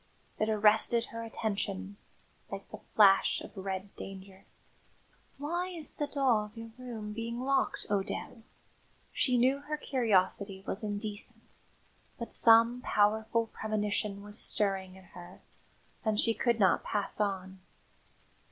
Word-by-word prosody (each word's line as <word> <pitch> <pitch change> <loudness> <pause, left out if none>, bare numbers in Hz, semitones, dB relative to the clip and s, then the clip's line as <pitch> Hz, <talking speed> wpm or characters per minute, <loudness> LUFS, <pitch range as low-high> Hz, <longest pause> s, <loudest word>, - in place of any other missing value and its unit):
It 215 - +1
arrested 220 +2 +4
her 230 - -5
attention 205 -3 -3 0.5
like - - -7
the - - -8 0.2
flash 195 -2 +6
of - - -11
red 190 0 -5
danger. 195 0 -10 0.9
"Why 340 +6 -2
is 340 -4 -3
the 295 - -1
door 260 -7 +2
of 210 +2 -15
your 225 0 -8
room 225 -4 -6
being 230 +2 -4
locked, 270 +1 0
O'Dell?" 205 +4 -3 0.7
She 255 -2 +2
knew 260 +3 +3
her 300 +1 -4
curiosity 200 -7 +1
was 195 - -3
indecent, 210 0 -5 0.6
but 235 - -6
some 230 +2 +6
powerful 220 +1 +2
premonition 210 -1 -2
was 210 +1 -4
stirring 190 -2 -1
in 190 - -14
her, 175 0 -11 0.6
and 215 -2 +1
she 230 - +4
could 235 0 +1
not 190 -4 +4
pass 205 0 -2
on. 190 -2 -2
215 Hz, 130 wpm, -31 LUFS, 200-235 Hz, 0.9 s, flash